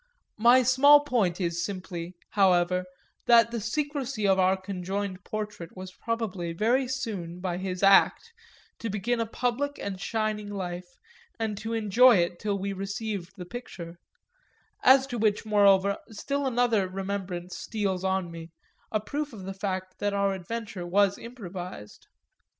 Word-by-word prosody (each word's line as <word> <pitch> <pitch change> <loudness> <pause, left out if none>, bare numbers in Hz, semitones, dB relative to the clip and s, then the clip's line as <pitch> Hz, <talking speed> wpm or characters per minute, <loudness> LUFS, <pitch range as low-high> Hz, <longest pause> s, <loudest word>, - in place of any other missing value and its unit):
My 240 +3 +6
small 280 +4 +7
point 225 -11 0
is 170 -2 -1
simply, 180 -3 -5 0.2
however, 180 -2 +3 0.4
that 230 -1 +6
the 235 -2 -3
secresy 270 -2 -2
of 190 -1 +4
our 185 +1 +4
conjoined 190 +1 -4
portrait 210 -5 -6
was 185 0 -8
probably 200 -8 -3
very 240 +8 +2
soon, 205 -10 -4
by 180 -1 -3
his 185 0 -4
act, 195 - +5 0.5
to 230 - -3
begin 220 +4 -1
a 230 - 0
public 250 +5 -1
and 195 -2 -5
shining 215 -1 -2
life 180 -2 -5 0.4
and 220 -2 -1
to 225 +2 -4
enjoy 230 +3 +5
it 175 -1 0
till 205 -1 -1
we 200 +1 -3
received 195 -1 -4
the 180 - -7
picture; 175 -6 -8 0.8
as 265 +1 +7
to 245 -3 -5
which 210 0 +1
moreover 200 -2 +4
still 275 +6 -2
another 235 -6 +2
remembrance 185 -2 -4
steals 195 -4 -2
on 190 -2 0
me, 165 0 -9 0.4
a 215 - +1
proof 285 +6 -4
of 200 -4 -9
the 195 - -4
fact 185 -1 -4
that 205 0 0
our 200 -1 +1
adventure 195 -1 -5
was 200 +2 +3
improvised. 185 - -9
200 Hz, 150 wpm, -27 LUFS, 185-230 Hz, 0.8 s, small